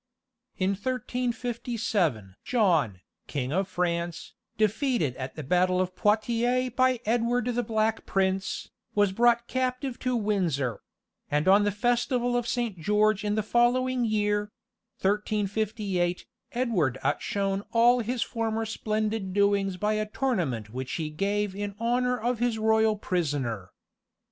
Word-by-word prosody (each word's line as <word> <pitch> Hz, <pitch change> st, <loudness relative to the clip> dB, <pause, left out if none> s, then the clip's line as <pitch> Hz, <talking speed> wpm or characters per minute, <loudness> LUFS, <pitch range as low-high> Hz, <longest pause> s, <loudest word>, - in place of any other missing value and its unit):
In 190 Hz, +1 st, +1 dB
1357 230 Hz, -, -2 dB
John, 165 Hz, -, +2 dB, 0.3 s
King 135 Hz, -1 st, -3 dB
of 190 Hz, +2 st, +1 dB
France, 170 Hz, -2 st, -2 dB, 0.2 s
defeated 215 Hz, -, +1 dB
at 130 Hz, 0 st, -6 dB
the 155 Hz, -, -6 dB
battle 180 Hz, +5 st, +2 dB
of 185 Hz, 0 st, -1 dB
Poitiers 235 Hz, +5 st, +1 dB
by 255 Hz, 0 st, +2 dB
Edward 235 Hz, +2 st, +1 dB
the 245 Hz, -1 st, 0 dB
Black 220 Hz, -1 st, -1 dB
Prince, 190 Hz, 0 st, -1 dB, 0.2 s
was 205 Hz, -2 st, +3 dB
brought 235 Hz, +3 st, +3 dB
captive 255 Hz, 0 st, -2 dB
to 255 Hz, -1 st, 0 dB
Windsor; 175 Hz, -, 0 dB, 0.5 s
and 150 Hz, +3 st, +1 dB
on 200 Hz, +2 st, +6 dB
the 205 Hz, -, +2 dB
festival 245 Hz, +3 st, +1 dB
of 240 Hz, -1 st, 0 dB
Saint 235 Hz, -6 st, -2 dB
George 210 Hz, +4 st, +2 dB
in 210 Hz, 0 st, 0 dB
the 215 Hz, -, 0 dB
following 245 Hz, +3 st, +2 dB
year; 210 Hz, -1 st, 0 dB, 0.5 s
1358, 205 Hz, -2 st, 0 dB, 0.3 s
Edward 205 Hz, -, +1 dB
outshone 195 Hz, -1 st, 0 dB
all 240 Hz, +2 st, +5 dB
his 240 Hz, +1 st, -1 dB
former 225 Hz, -1 st, -2 dB
splendid 215 Hz, -2 st, -2 dB
doings 200 Hz, -2 st, +2 dB
by 210 Hz, +3 st, 0 dB
a 215 Hz, 0 st, -1 dB
tournament 170 Hz, -, -1 dB
which 130 Hz, +2 st, -5 dB
he 155 Hz, -2 st, -3 dB
gave 200 Hz, +4 st, -1 dB
in 205 Hz, 0 st, -4 dB
honour 250 Hz, +2 st, +1 dB
of 240 Hz, +1 st, -1 dB
his 240 Hz, -2 st, +1 dB
royal 220 Hz, 0 st, +3 dB
prisoner. 140 Hz, -, -2 dB
210 Hz, 130 wpm, -27 LUFS, 185-240 Hz, 0.5 s, on